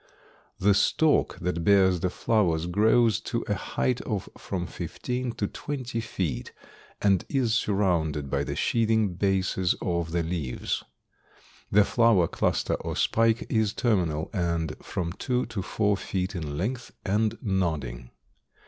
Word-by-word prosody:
The 100 +2 +4
stalk 150 +9 +2
that 85 -1 -1
bears 95 -1 +4
the 90 - 0
flowers 90 -6 +1
grows 110 +3 +3
to - - -3
a - - +1
height 65 0 -1
of - - -3
from 90 -3 -4
fifteen 125 +10 -4
to 105 - -2
twenty 125 0 -4
feet 85 - -3 0.5
and 95 -3 +4
is 125 -5 +1
surrounded 85 - +1
by - - 0
the - - -3
sheathing 110 -4 +2
bases 95 -1 +1
of 85 -2 -1
the 85 0 0
leaves. 80 -6 -3 0.9
The 105 0 +6
flower 115 -8 +4
cluster - - 0
or - - -3
spike 115 +1 +2
is 110 -3 +1
terminal 90 - 0
and 85 -5 -1
from 85 -2 -3
two 125 +5 -1
to 110 -4 -4
four 105 +1 +1
feet 95 -1 -3
in 75 -5 -4
length 120 - -3
and 110 +3 +1
nodding. 80 - -2
95 Hz, 140 wpm, -27 LUFS, 85-110 Hz, 0.9 s, The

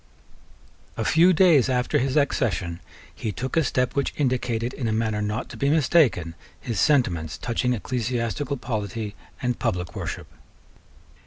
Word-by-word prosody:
A - - -1
few 170 +3 +5
days 160 -7 +5
after 125 -1 +1
his 135 +3 0
accession, 95 - 0 0.3
he 110 - -4
took 130 +7 -4
a 165 - +4
step 125 -1 0
which 140 -1 -1
indicated, 125 -3 0
in 125 - -3
a - - 0
manner 110 -1 0
not 105 +3 -2
to - - -9
be 140 - +1
mistaken, 135 - +3 0.3
his 115 -4 -3
sentiments 90 - +2
touching 125 +1 0
ecclesiastical 125 +4 -2
polity 110 -3 -4 0.3
and 125 -1 -1
public 90 -1 -2
worship. - - -5
125 Hz, 145 wpm, -24 LUFS, 110-135 Hz, 0.3 s, few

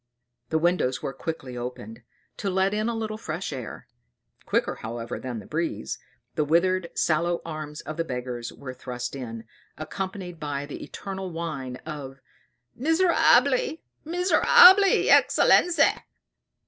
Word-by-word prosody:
The 160 - +1
windows 160 -6 +1
were 135 - -3
quickly 135 -3 -6
opened, 120 -2 -7 0.4
to 200 - -2
let 190 +1 +1
in 215 +2 0
a 235 - -2
little 215 -1 -4
fresh 160 -3 -4
air. 125 -4 -7 0.6
Quicker, - - +1
however, 115 +1 -6
than 125 -2 -5
the 105 - -8
breeze, 165 +2 -3 0.3
the 150 - 0
withered, 170 +3 +2
sallow 170 +2 +1
arms 155 -2 -6
of 155 - -7
the 165 - 0
beggars 125 -4 -5
were 130 -2 -8
thrust 125 0 -6
in, 115 -4 -6 0.3
accompanied 185 +1 -6
by 145 -2 -3
the 145 - -8
eternal 190 -1 -6
whine 155 -7 -5
of 140 -4 -7 0.6
"Miserabili, 310 -2 +3 0.2
miserabili, 365 +3 +6
excellenza!" 355 -1 +4
160 Hz, 130 wpm, -25 LUFS, 130-195 Hz, 0.6 s, miserabili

